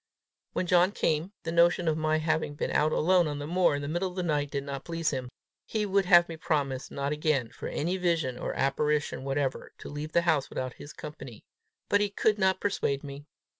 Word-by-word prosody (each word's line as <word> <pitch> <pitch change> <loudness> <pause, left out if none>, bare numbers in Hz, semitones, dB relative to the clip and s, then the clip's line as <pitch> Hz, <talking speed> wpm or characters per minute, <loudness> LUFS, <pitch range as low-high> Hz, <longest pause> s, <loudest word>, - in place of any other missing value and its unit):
When - - -1
John 180 +2 +4
came, 160 +1 0
the 165 - -3
notion 170 +1 +3
of 160 - +3
my 155 0 +1
having 155 -1 -1
been - - -2
out 155 +1 +2
alone 175 +1 +3
on 145 -1 -3
the 145 - -5
moor 175 -1 +2
in 145 - -4
the - - -3
middle 175 +5 -1
of 180 - -12
the 185 - -2
night, 145 -4 0
did 140 -1 -3
not 140 -1 -5
please 165 -1 -1
him. 130 -3 -4 0.4
He 215 -1 -1
would 195 -1 +2
have 175 -2 +7
me 165 - -7
promise 140 -5 -1
not 140 0 -3
again, 150 -5 0
for 125 - -7
any 175 +5 -1
vision 165 -8 0
or - - -3
apparition 145 +1 0
whatever, 135 -1 -2
to - - -9
leave 150 +2 -6
the 170 - +3
house 155 -5 +1
without 130 -1 -4
his 145 - -11
company. 135 -8 -9 0.4
But 205 - +3
he 205 - +1
could 210 +1 +1
not 190 -1 +2
persuade 140 -8 -1
me. 145 +1 -9
155 Hz, 220 wpm, -28 LUFS, 145-175 Hz, 0.4 s, have